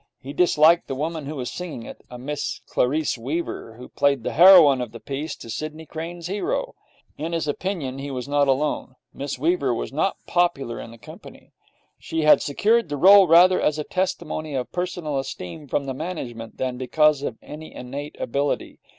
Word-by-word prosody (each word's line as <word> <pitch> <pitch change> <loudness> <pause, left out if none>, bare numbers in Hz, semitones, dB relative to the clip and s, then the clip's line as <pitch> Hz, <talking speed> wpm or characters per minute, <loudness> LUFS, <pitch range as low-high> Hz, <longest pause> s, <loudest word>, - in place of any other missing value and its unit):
He 140 +1 -8
disliked 165 0 +4
the 135 - -3
woman 155 +1 -3
who 155 - -5
was 125 -3 -4
singing 170 -10 -6
it - - -10
a 125 - -9
Miss 130 -2 -4
Clarice 140 0 0
Weaver, 130 -3 -4
who 125 +2 -11
played 140 -4 +1
the - - -2
heroine 165 -6 +8
of 120 -2 -5
the 115 - -8
piece 140 +6 -5
to - - -12
Sidney 155 +7 -6
Crane's 165 +2 -7
hero. - - -2 0.5
In 165 +2 -3
his 165 -2 -1
opinion 145 -4 -3
he 140 +1 -5
was 130 -1 -5
not 145 0 +2
alone. 135 -1 -1 0.2
Miss 140 -1 -5
Weaver 140 -4 +1
was - - -5
not 160 +7 0
popular 170 -9 0
in - - -8
the 115 - -13
company. 110 - -14 0.5
She 160 - -3
had 155 0 +6
secured 215 +8 +1
the 145 - -3
role 195 +4 +8
rather 180 +3 +6
as 150 - +1
a 150 - -2
testimony 155 -4 -3
of 125 -1 -3
personal 175 -5 -3
esteem 135 - -7
from 140 +1 -1
the 135 - -3
management 125 -8 -6
than 130 -1 -2
because 150 +3 +3
of 110 - -4
any 155 +1 -9
innate 140 +4 -7
ability. 140 +4 -2
150 Hz, 185 wpm, -23 LUFS, 130-170 Hz, 0.5 s, heroine